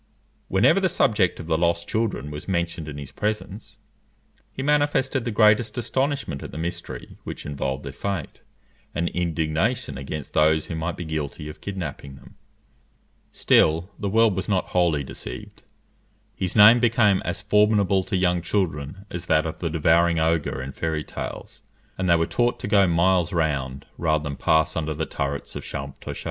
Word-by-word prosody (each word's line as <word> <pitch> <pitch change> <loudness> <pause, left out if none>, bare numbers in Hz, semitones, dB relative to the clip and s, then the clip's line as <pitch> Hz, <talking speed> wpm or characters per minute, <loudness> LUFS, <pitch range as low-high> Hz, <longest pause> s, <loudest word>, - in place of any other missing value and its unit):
Whenever 110 - +4
the 190 -1 +2
subject 105 - +2
of 85 - -6
the 80 -1 0
lost 85 0 +1
children 110 -10 -2
was 75 0 -7
mentioned 85 -3 -2
in 75 -1 -6
his 70 -2 -8
presence, 105 0 -4 0.7
he 135 - -5
manifested 145 -3 +1
the - - -1
greatest 110 +3 +3
astonishment 130 - -1
at - - -7
the - - -8
mystery 85 +2 -6
which - - -7
involved 70 -1 -3
their 70 - -5
fate, 95 +1 -4 0.5
and 85 +2 0
indignation 80 - -1
against 70 +1 -6
those 80 0 +3
who 85 - -5
might 80 +2 -3
be 85 - -5
guilty 75 -1 -4
of 75 - -10
kidnapping 75 -8 -6
them. - - -16 1.0
Still 80 +5 +3
the 100 - -2
world 110 -1 +4
was 95 +3 -3
not 95 -3 0
wholly 85 -5 +2
deceived; 65 -1 -8 0.7
his 90 -2 -3
name 110 +3 +8
became 115 -5 +3
as 90 +1 -3
formidable 105 -2 +3
to 95 - -1
young 90 -1 +2
children 85 -1 -2
as 90 0 -5
that 75 +1 +3
of 80 - -5
the 85 - -2
devouring 85 +2 +3
ogre 80 -4 0
in 70 - -6
fairy 80 +1 -2
tales, - - -7 0.4
and 95 -1 0
they 85 - +6
were 85 0 +2
taught 120 +5 0
to - - -3
go 100 -2 +4
miles 85 +1 +2
round, 70 -5 -1
rather 80 -3 +1
than 70 -1 -4
pass 80 +3 +2
under 80 -1 -2
the 80 +1 -2
turrets 70 0 -4
of - - -5
Champtocé. 70 -1 -7
85 Hz, 170 wpm, -24 LUFS, 75-105 Hz, 1.0 s, name